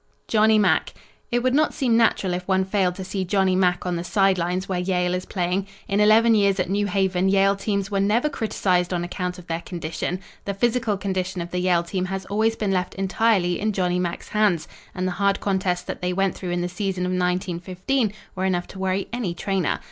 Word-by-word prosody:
Johnny 220 0 +4
Mack 185 -6 +2 0.3
It 240 0 0
would 255 0 +2
not 305 +2 +2
seem 255 -6 +2
natural 225 -5 +2
if 180 0 -4
one 190 -1 +2
failed 190 -2 +1
to 190 - -6
see 190 +1 -3
Johnny 190 0 +2
Mack 180 -1 +1
on 180 -1 -1
the 170 - -3
side 195 0 +2
lines 180 +2 -1
where 185 -2 -1
Yale 180 -1 0
is 180 0 -3
playing. 185 +1 -1 0.2
In 200 +1 0
eleven 220 +2 +6
years 200 -2 +3
at 185 - -1
New 205 +1 +1
Haven 190 -2 +1
Yale 195 0 +4
teams 200 0 -2
were 200 - +1
never 215 +8 +2
criticised 185 -9 0
on 175 - -1
account 180 +1 -4
of 180 - -12
their 165 -1 -3
condition. 170 +1 -4 0.3
The 200 - -3
physical 230 -1 +1
condition 190 -1 -2
of 170 0 -5
the 180 - -1
Yale 180 -1 +2
team 185 +1 -2
has 190 0 -4
always 220 +2 +1
been 205 -3 -1
left 185 -1 -1
entirely 195 -2 +1
in 215 +1 0
Johnny 180 -2 0
Mack's 175 -1 -3
hands, 210 -6 +1 0.3
and 185 0 -1
the - - -1
hard 200 0 +2
contests 185 -3 0
that - - -6
they 180 0 -1
went 195 0 +1
through 180 - -6
in 175 0 -1
the 175 - -1
season 185 0 -2
of 180 - -1
1915 185 +6 -1 0.2
were 185 - -4
enough 180 -2 0
to 190 - -10
worry 190 +1 -1
any 215 -8 -2
trainer. 190 -2 -1
190 Hz, 220 wpm, -23 LUFS, 180-200 Hz, 0.3 s, eleven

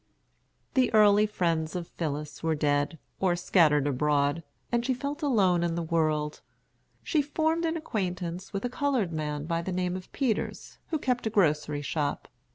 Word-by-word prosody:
The 260 -2 +3
early 210 0 +6
friends 165 -5 -1
of 175 -2 -3
Phillis 150 -2 -4
were 160 -1 +1
dead, 145 +1 +1 0.2
or 185 -2 +2
scattered 160 -5 +3
abroad, 145 +2 +1 0.3
and 240 0 +1
she 260 +1 0
felt 280 +5 -4
alone 200 - +3
in 170 -1 0
the 170 - -2
world. 155 -2 0 0.6
She 310 - +2
formed 315 +3 0
an 330 0 0
acquaintance 180 - -3
with 200 +4 -3
a - - +2
colored 250 -8 0
man 150 -1 -3
by 165 0 -1
the 185 - -4
name 180 0 -1
of 185 -1 -8
Peters, 250 -7 -2
who 320 - -1
kept 250 -5 -1
a - - +1
grocery 150 -7 +1
shop. 145 -1 -2
175 Hz, 165 wpm, -28 LUFS, 155-235 Hz, 0.6 s, early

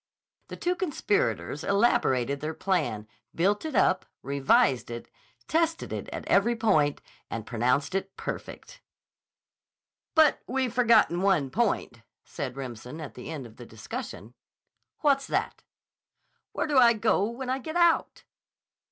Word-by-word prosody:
The - - -7
two 360 +1 0
conspirators 395 - -1
elaborated 140 - +2
their 155 +2 -4
plan, 150 - -1 0.3
built 200 - +1
it 310 -5 -4
up, 185 - +2 0.2
revised 135 -2 +2
it, 120 0 -8 0.4
tested 330 0 0
it - - -5
at - - -7
every 225 +5 +3
point, 175 -11 +2 0.3
and 115 -1 -5
pronounced 125 +7 0
it 195 0 -3
perfect. - - -7 1.3
"But 315 -2 +5
we've 260 -3 -1
forgotten 225 -8 +4
one 185 -9 +2
point," 210 - -1 0.2
said 135 -4 -6
Remsen 125 +2 -7
at 150 -3 -7
the 125 - -9
end 150 -5 -6
of 115 -2 -14
the 120 - -10
discussion. 110 0 -8 0.7
"What's 275 -2 +2
that?" - - -2 0.9
"Where - - -2
do 290 -4 +3
I 235 -2 +7
go 220 -2 +1
when 255 +2 -5
I 260 - -1
get 315 +5 -7
out?" 345 -1 +2
195 Hz, 135 wpm, -27 LUFS, -, 1.3 s, I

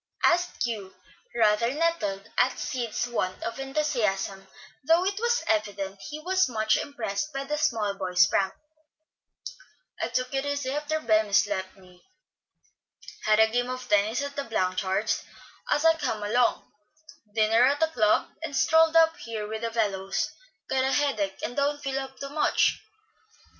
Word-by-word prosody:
asked 350 +1 +2
Hugh, 210 -5 -5 0.4
rather 225 +1 +3
nettled 270 -11 -1
at 260 - +2
Sid's 240 -2 -2
want 185 -6 -3
of 230 +3 -4
enthusiasm, 225 -9 -1 0.4
though 330 +5 +3
it 395 +1 -1
was 475 +1 +1
evident 200 -2 -1
he 300 - -5
was 375 0 +1
much 220 -2 +2
impressed 280 0 -3
by 275 -1 -4
the 295 +2 -2
"small 225 -10 0
boy's" 180 -3 +3
prank. 190 +4 0 1.5
"I - - 0
took 255 +1 -2
it 270 0 0
easy 285 -2 -2
after 300 +2 -1
Bemis 215 -3 +3
left 190 -2 -4
me. 180 -2 -19 1.2
Had 215 0 +4
a 220 0 +5
game 245 +1 0
of 255 0 -5
tennis 210 +5 +2
at 285 0 -6
the 280 - -2
Blanchards' 190 -1 -1 0.5
as 295 +2 +1
I 325 - +7
came 215 -9 -2
along, 235 +4 +1 0.7
dinner 225 +2 +4
at 285 +2 +1
the 320 - +4
club, 215 -10 +2 0.2
and 295 -4 -4
strolled 320 0 +4
up 325 0 +5
here 220 -2 -5
with 220 +1 -5
the 230 - -1
fellows. 195 -4 -1 0.4
Got 260 0 +1
a 265 - +1
headache, 210 -10 0
and 245 - -3
don't 285 +1 +1
feel 270 -1 -2
up 265 0 -8
to 275 - -5
much." 300 +1 +2
235 Hz, 160 wpm, -27 LUFS, 210-285 Hz, 1.5 s, I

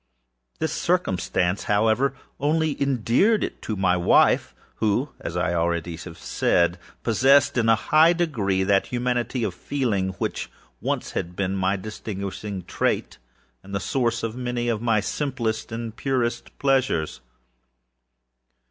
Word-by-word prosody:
This 160 -1 -1
circumstance, 95 - 0
however, 110 +6 +2 0.2
only 155 +1 +1
endeared 140 - +2
it - - -5
to 110 - -3
my 95 -2 +2
wife, 90 - +3 0.2
who, 110 +7 +1
as 85 - -5
I 90 - +1
have 85 -1 0
already 85 0 -1
said, 85 +1 0 0.2
possessed, 135 +5 +4
in 115 -2 +2
a 115 - +7
high 155 +8 +5
degree, 115 - 0
that 100 0 +2
humanity 125 0 -1
of 100 - -1
feeling 100 -5 -1
which 95 - -3
had - - -24 0.3
once - - -2
been 95 +2 -2
my 95 +1 +1
distinguishing 100 -1 -5
trait, - - -1 0.4
and 100 +1 -8
the - - +1
source 120 0 0
of 115 0 -3
many 125 -1 -2
of 110 -2 -1
my 115 -3 +2
simplest 115 -3 -2
and 115 -1 -5
purest 120 -3 -2
pleasures. 130 - +1
115 Hz, 135 wpm, -24 LUFS, 95-130 Hz, 0.4 s, a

